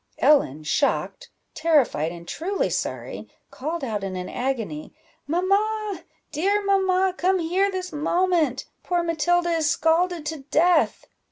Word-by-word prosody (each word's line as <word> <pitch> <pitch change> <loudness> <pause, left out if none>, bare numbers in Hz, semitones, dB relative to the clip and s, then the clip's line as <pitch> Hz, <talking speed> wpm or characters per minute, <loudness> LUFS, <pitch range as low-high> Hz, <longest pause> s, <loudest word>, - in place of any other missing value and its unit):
Ellen, 155 - +3
shocked, 280 - -1 0.2
terrified, 290 - +2
and 170 0 -10
truly 385 - -2
sorry, - - -4 0.2
called 310 +3 -4
out 215 -5 -3
in 190 -1 -4
an 180 0 -5
agony 230 - -4 0.3
"Mamma, 400 +5 0 0.3
dear 400 +7 +1
mamma, 380 -1 +2
come 375 +1 +2
here 365 +4 +1
this 370 -2 -5
moment! 315 -3 +1 0.2
poor 350 -1 0
Matilda 345 +1 +1
is 320 -3 +1
scalded 330 +1 +1
to 320 +1 -3
death!" 350 +3 +3
330 Hz, 125 wpm, -24 LUFS, 280-370 Hz, 0.3 s, Ellen